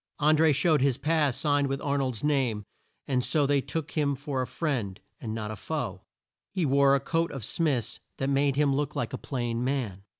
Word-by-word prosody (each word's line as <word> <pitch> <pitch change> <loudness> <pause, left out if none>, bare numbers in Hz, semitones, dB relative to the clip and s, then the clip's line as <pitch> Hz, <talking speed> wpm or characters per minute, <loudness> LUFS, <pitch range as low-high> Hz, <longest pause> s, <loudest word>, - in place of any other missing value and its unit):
An 150 +1 +4
dré 160 0 +5
showed 150 +1 +3
his 135 -2 +2
pass 150 -2 +1
signed 145 -1 +2
with 135 0 -2
Ar 140 0 0
nold's 130 -4 -2
name, 130 -8 +1 0.4
and 125 -3 +1
so 145 +3 +2
they 140 0 +2
took 160 +2 -4
him 145 -3 +1
for 140 -1 -3
a 125 - -2
friend 115 - -2 0.2
and 110 -2 -4
not 110 -1 -4
a - - -5
foe. - - -4 0.5
He 185 -4 0
wore 140 0 +4
a - - +2
coat 165 +4 -1
of 135 -7 -6
Smith's 140 -9 -1 0.2
that 135 - -1
made 140 0 +2
him 145 -1 +3
look 145 +1 -1
like - - -2
a - - -3
plain 120 -3 -2
man. 125 -8 -2
140 Hz, 210 wpm, -28 LUFS, 125-150 Hz, 0.5 s, dré